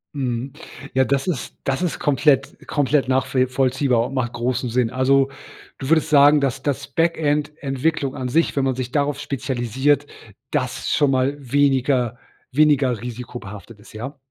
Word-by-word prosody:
Mhm. 130 -1 -3 0.4
Ja, 130 - +4
das 135 +3 0
ist 165 -9 -3
das 135 +2 -1
ist 180 -3 -2
komplett 140 -1 +2
komplett 145 -1 +1
nachvi 130 0 +1
vollziehbar 130 -2 +1
und - - -9
macht 125 -3 -2
großen 125 +1 -1
Sinn. 120 0 +1
Also 135 +2 +2 0.5
du 135 - -5
würdest 160 0 +3
sagen, 145 0 +6
dass 135 -1 -1
dass 145 -3 -2
Backend-Entwicklung 150 -3 -1
an 130 -3 -3
sich 165 +6 +1
wenn 140 - +1
man 135 -1 0
sich 125 -1 -4
darauf 145 0 0
spezialisiert, 135 0 0 0.4
das 130 -4 -2
schon 145 -2 +3
mal 130 +2 +1
weniger 130 -3 +1 0.3
weniger 135 -4 +3
risikobehaftet 115 -3 -8
ist, 105 - -16
ja? 130 +7 -7
135 Hz, 150 wpm, -21 LUFS, 125-145 Hz, 0.5 s, sagen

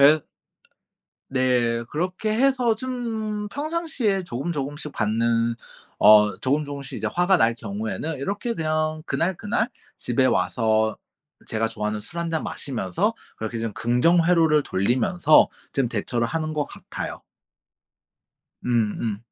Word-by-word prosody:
에 150 +2 +6 1.0
네 125 -3 +1
그렇게 185 +7 -1
해서 250 -1 +3
좀 220 -4 -3
평상시에 285 - -1
조금 155 0 -3
조금씩 145 0 -4
받는 115 +1 +1 0.4
어 105 0 +7
조금 145 +3 +1
조금씩 140 -2 -6
이제 - - -1
화가 180 +2 +4
날 115 -8 +3
경우에는 200 - -4
이렇게 205 - -2
그냥 155 -1 -1
그날, 185 +3 0
그날 215 +3 -1 0.3
집에 125 +2 0
와서 110 -3 +1 0.5
제가 110 0 0
좋아하는 105 -1 -3
술 170 +10 -6
한 170 -1 -2
잔 160 -1 -1
마시면서 105 -10 -1 0.2
그렇게 110 +1 -4
좀 115 -1 -3
긍정 125 - +3
회로를 160 -3 +4
돌리면서 135 - +3 0.2
좀 135 -3 +1
대처를 120 +1 -1
하는 155 +3 -2
것 150 -1 0
같아요. - - -7 1.4
음 - - -3 0.3
음. 110 -3 -2
150 Hz, 265 characters per minute, -24 LUFS, 115-185 Hz, 1.4 s, 어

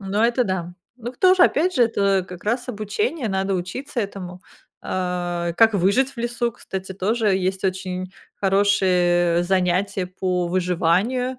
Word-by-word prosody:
Ну, 200 +2 -2
это 240 +1 +2
да. 180 -3 -3 0.2
Ну, 240 +1 -7
кто 370 +8 +4
же, 370 - +4
опять 360 +5 +3
же, 245 - +4
это 200 -4 +1
как 180 +1 -11
раз 240 +4 -1
обучение, 240 - -2
надо 195 0 -1
учиться 240 +10 -4
этому. 185 -3 -6 0.4
А, 175 -2 -2
как 225 0 +4
выжить 200 +9 +2
в - - -22
лесу, 240 0 -1
кстати, 190 -2 -7
тоже 210 +2 0
есть 190 +1 -2
очень 185 0 -3 0.3
хорошие, 180 -3 +2
э, - - 0
занятия 185 +1 0
по 180 -1 -2
выживанию. 185 +8 0
195 Hz, 155 wpm, -22 LUFS, 180-230 Hz, 0.4 s, кто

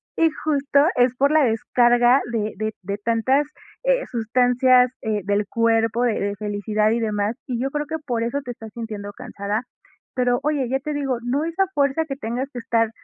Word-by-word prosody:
Y 330 - +4 0.2
justo 285 -1 +3
es 250 0 +3
por 280 +3 +2
la 310 -1 +5
descarga 240 +2 +3
de 215 -2 -2
de 215 +1 -2
de 200 +2 -3
tantas, 245 +6 +2 0.4
eh, - - +2
sustancias, 250 +2 +3
eh, 215 -2 -1
del 205 +1 +1
cuerpo, 230 0 +2
de 240 -2 +2
de 200 0 -2
felicidad 210 +1 0
y 235 - +1
demás, 210 0 -1
y 245 -3 -2
yo 270 - -1
creo 295 0 -2
que 320 - -3
por 235 -4 -1
eso 240 +5 -1
te 245 - -4
estás 225 -2 -10
sintiendo 215 -3 -6
cansada. 200 +3 -4 0.5
Pero, 245 -1 +2
oye, 290 -3 0
ya 265 +1 0
te 300 +2 -4
digo, 275 -3 -1
no 270 +5 0
es 330 0 -5
a 385 - +5
fuerza 285 +2 +1
que 275 -3 -5
tengas 250 0 -3
que 245 - -5
estar 230 -1 +1
245 Hz, 200 wpm, -22 LUFS, 220-275 Hz, 0.5 s, la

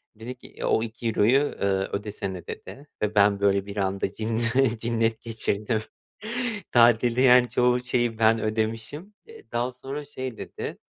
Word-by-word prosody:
Dedi 120 +4 -7
ki, - - -14
e - - -6
o 110 - +2
€2'yu, 115 +1 +2 0.2
eee, 100 - +2 0.2
ödesene, 100 -3 -4
dedi 145 +2 -9
ve 105 0 -1
ben 100 0 +4
böyle, 100 -1 +2
bir 100 0 -8
anda 95 -1 -1
cinne 115 +3 0
cinnet 115 0 0
geçirdim. 110 -1 -1 0.9
Tatilde, 120 +1 +4
yani, 125 -2 +6
çoğu 125 +1 +2
şeyi 120 -2 0
ben 110 0 +4
ödemişim. 115 - -2
Eee, 450 -1 -15
daha 120 +2 -1
sonra 135 +4 -7
şey 130 -4 -6
dedi, - - -6
115 Hz, 150 wpm, -25 LUFS, 110-125 Hz, 0.9 s, yani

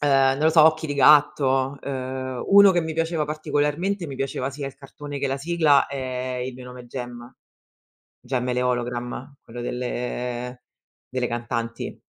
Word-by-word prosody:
ehm, 135 -2 +4
non 150 - -1
lo - - +5
so, 160 -1 +7
"Occhi 160 0 +3
di 145 - -3
gatto". 140 -2 +4
Ehm, 130 -1 -4
uno 200 0 +8
che 175 - +2
mi 160 -1 -3
piaceva 165 -1 0
particolarmente, 155 +5 -1
mi 135 - -7
piaceva 135 0 -2
sia 140 +1 -6
il 135 - -7
cartone 145 +1 -8
che 140 - -1
la 135 - -1
sigla, 155 -1 +3
è 130 -2 -4
"Il 130 0 -6
Mio 125 0 -10
Nome 125 -1 -10
Jem". 120 0 -8 0.9
"Jem 125 0 -2
e 125 - +1
le 125 - 0
Ologram", 125 +2 -3
quello 120 +1 -8
delle 125 0 -4 0.5
delle 125 -1 0
cantanti. 115 0 -4
135 Hz, 170 wpm, -24 LUFS, 125-145 Hz, 0.9 s, uno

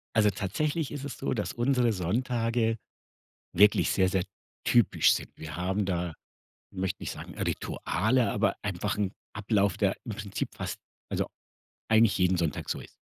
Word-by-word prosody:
Also, 105 -2 +5
tatsächlich 145 - -1
ist 145 -2 -5
es 140 - -6
so, - - -1
dass 105 -5 -2
unsere 120 -1 +2
Sonntage 115 +4 0 0.8
wirklich 105 +2 +5
sehr, 95 -1 +3
sehr 95 -1 +1 0.4
typisch 120 -5 +5
sind. - - -2
Wir 80 - -7
haben 95 +4 0
da, 90 -3 -1 0.6
ich 95 - -11
möchte 95 0 -2
nicht - - -3
sagen, - - -9
Rituale, 120 +4 0
aber 100 -2 +1
einfach 100 0 -2
'n 100 -3 +1 0.2
Ablauf, 100 -1 +1
der 100 -2 +2
im 115 - -4
Prinzip 100 -1 -4
fast, - - -4 0.3
also, - - -1 0.6
eigentlich 110 -1 +5
jeden 90 0 +3
Sonntag 80 -5 -1
so - - -1
ist. - - -11
105 Hz, 160 wpm, -29 LUFS, 95-115 Hz, 0.8 s, Also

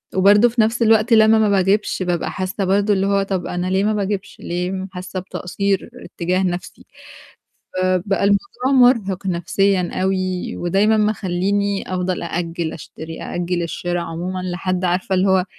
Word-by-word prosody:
وبرضه 205 +5 +5
في 235 0 +1
نفس 225 +2 +1
الوقت 225 0 +4
لمّا 220 0 +6
ما 215 - +3
باجيبش 195 0 +1
بابقى 175 -2 -1
حاسة 190 +1 -3
برضه 200 +2 +2
اللي 195 0 +1
هو 200 0 +2
طب 190 -2 -3
أنا 180 +1 -3
ليه 190 +1 +1
ما 215 +1 +1
باجيبش، 200 -1 -3
ليه 185 +2 -3
حاسة 185 0 -6
بتقصير 195 +3 -2
اتجاه 185 -6 -2
نفسي. 180 -1 -4 0.9
فبَقى 185 +2 +1
الموضوع 245 +6 0 0.2
مرهِق 195 -4 -5
نفسيًا 185 +1 +1
أوي، 185 -1 -1
ودايمًا 195 +5 +2
مخلّيني 200 -1 0
أفضل 180 0 -2
أأجّل 170 -1 -3
أشتري 160 +1 -9
أأجّل 175 0 -2
الشرا 175 +1 -3
عمومًا 175 +2 -4
لحد 185 0 -2
عارفة 185 +2 0
اللي 190 +1 +2
هو 190 -1 +3
190 Hz, 150 wpm, -20 LUFS, 180-200 Hz, 0.9 s, لمّا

